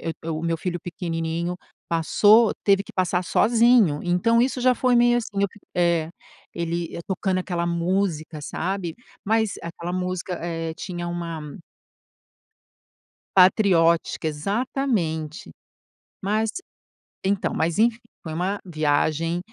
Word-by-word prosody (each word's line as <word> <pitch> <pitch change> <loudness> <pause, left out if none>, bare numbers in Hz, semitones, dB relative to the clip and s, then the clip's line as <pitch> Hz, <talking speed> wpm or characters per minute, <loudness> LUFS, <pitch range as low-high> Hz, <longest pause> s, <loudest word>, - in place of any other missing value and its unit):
eh, 165 - -3
o - - -7
eh, - - -1
o 155 0 -3
meu 165 0 0
filho 175 0 -3
pequenininho 170 0 -3 0.3
passou, 205 +7 +5
teve 195 -1 +4
que - - -14
passar 180 -1 0
sozinho. 230 -8 +4
Então 205 +7 +2
isso 255 0 -1
já 255 0 +4
foi 250 +1 +2
meio, 240 0 +4
assim, 220 -3 -6
eu 200 - +4
fiq 205 - -19
é. 170 -2 +2 0.4
Ele 170 0 -3
e - - -5
tocando 190 0 -1
aquela 175 -2 -2
música, 170 -2 -1
sabe? 175 +2 -3 0.3
Mas 220 0 +1
aquela 170 +1 -6
música, 180 0 -3
eh 165 -1 -3
tinha 175 -1 -5
uma 170 -2 -4 2.0
patriótica, 175 -4 +4
exatamente. 190 - -2 0.7
Mas 215 +3 0 0.7
então 195 0 0
mas 160 +1 0
enfim. 230 +2 +3 0.2
Foi 160 -2 -6
uma 190 +5 -1
viagem, 155 +1 0
175 Hz, 130 wpm, -24 LUFS, 165-205 Hz, 2.0 s, passou